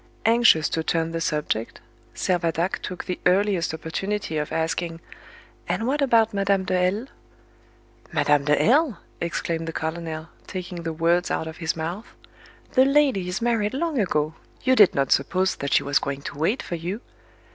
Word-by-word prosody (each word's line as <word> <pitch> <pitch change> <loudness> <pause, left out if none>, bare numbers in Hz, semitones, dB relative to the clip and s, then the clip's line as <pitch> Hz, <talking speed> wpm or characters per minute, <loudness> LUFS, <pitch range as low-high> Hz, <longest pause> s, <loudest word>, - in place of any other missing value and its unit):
Anxious 225 -9 +5
to 160 - -1
turn 165 0 0
the 165 0 -3
subject, 150 -8 -2 0.4
Servadac 175 0 0
took 185 - -6
the 180 - -3
earliest 190 -2 +2
opportunity 160 +3 -3
of 150 - -4
asking, 165 +1 -2 0.7
"And 185 +6 0
what 285 +4 0
about 230 -5 +3
Madame 195 -1 +1
de 185 - -1
L 185 +6 +1 0.5
?" - - -30
"Madame 145 -1 +2
de 150 0 +3
L 280 +1 +3
!" - - -32
exclaimed 165 -1 -2
the - - -2
colonel, 160 0 -4 0.2
taking 180 -2 -6
the 165 -1 -3
words 170 +2 +1
out - - -1
of 160 0 -7
his 165 -1 -2
mouth; 170 +7 -5 0.6
"the 260 - +5
lady 270 -9 +3
is 190 +6 -3
married 230 -1 +1
long 315 -2 -1
ago; 155 -6 0 0.3
you 260 0 +4
did 205 -6 +6
not 135 -1 +1
suppose 185 +7 +2
that 140 - -4
she - - +4
was 140 +1 +2
going 140 0 -4
to - - -6
wait 200 - +1
for - - -6
you. 175 +7 -4
175 Hz, 175 wpm, -24 LUFS, 160-210 Hz, 0.7 s, did